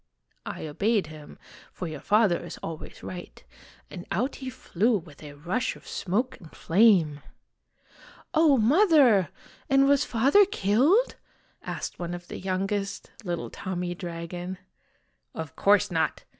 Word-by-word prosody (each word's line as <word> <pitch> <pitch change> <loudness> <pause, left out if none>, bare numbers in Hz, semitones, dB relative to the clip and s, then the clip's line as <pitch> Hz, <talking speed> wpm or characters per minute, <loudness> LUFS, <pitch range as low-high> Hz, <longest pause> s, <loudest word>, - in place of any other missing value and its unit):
" - - -42
I - - -5
obeyed 200 +7 0
him, 155 -1 -12 0.3
for 180 - -6
your 155 - -6
father 210 -5 +2
is 170 - -8
always 160 -1 -8
right, 180 -1 -9 0.5
and 180 -2 -8
out 245 +9 -1
he 260 -1 -6
flew 225 -1 0
with 155 -5 -13
a 150 -2 -9
rush 175 +12 -2
of - - -16
smoke 215 +8 -2
and 165 - -13
flame." 170 -6 +3 1.1
"Oh, 310 -4 +5
Mother! 255 - +5 0.4
and 270 0 +5
was 280 -1 +4
Father 275 - +4
killed?" 300 - +2 0.4
asked - - -6
one 175 0 -4
of 175 0 -11
the - - -6
youngest 195 +1 -3
little 175 -3 -4
Tommy 180 -2 -4
Dragon. 175 +1 -6 0.4
" - - -46
Of 160 -4 -6
course 200 -2 +3
not 160 -2 -1
190 Hz, 145 wpm, -27 LUFS, 170-240 Hz, 1.1 s, Oh